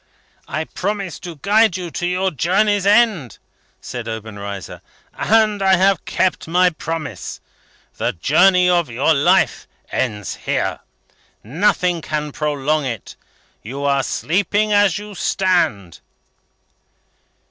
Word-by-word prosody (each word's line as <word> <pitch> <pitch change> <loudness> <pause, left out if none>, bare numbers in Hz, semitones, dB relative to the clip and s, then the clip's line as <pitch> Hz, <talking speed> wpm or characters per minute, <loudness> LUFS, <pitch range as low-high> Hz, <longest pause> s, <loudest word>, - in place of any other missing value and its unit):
"I 155 - -2
promised 195 +1 -4
to 170 -2 -7
guide 205 +4 +3
you 175 -2 -6
to 175 - -2
your 185 +1 0
journey's 195 +6 +1
end," 205 - +3 0.4
said - - -6
Obenreizer, 100 -3 -7 0.3
"and 215 -2 +2
I 190 -1 +5
have 195 +2 +2
kept 185 -3 0
my 180 +2 +3
promise. 160 -5 -5 0.6
The - - 0
journey 180 - +4
of 175 -4 +2
your 135 +7 +2
life 140 -1 +2 0.2
ends 105 -6 -2
here. - - -1 0.6
Nothing 175 - +1
can 150 -1 -3
prolong 150 +1 -1
it. 115 -6 -5 0.5
You 135 +6 -6
are 140 -1 +2
sleeping 205 - 0
as 205 -4 +3
you 210 0 -8
stand." 175 - 0
175 Hz, 115 wpm, -19 LUFS, 140-195 Hz, 0.6 s, I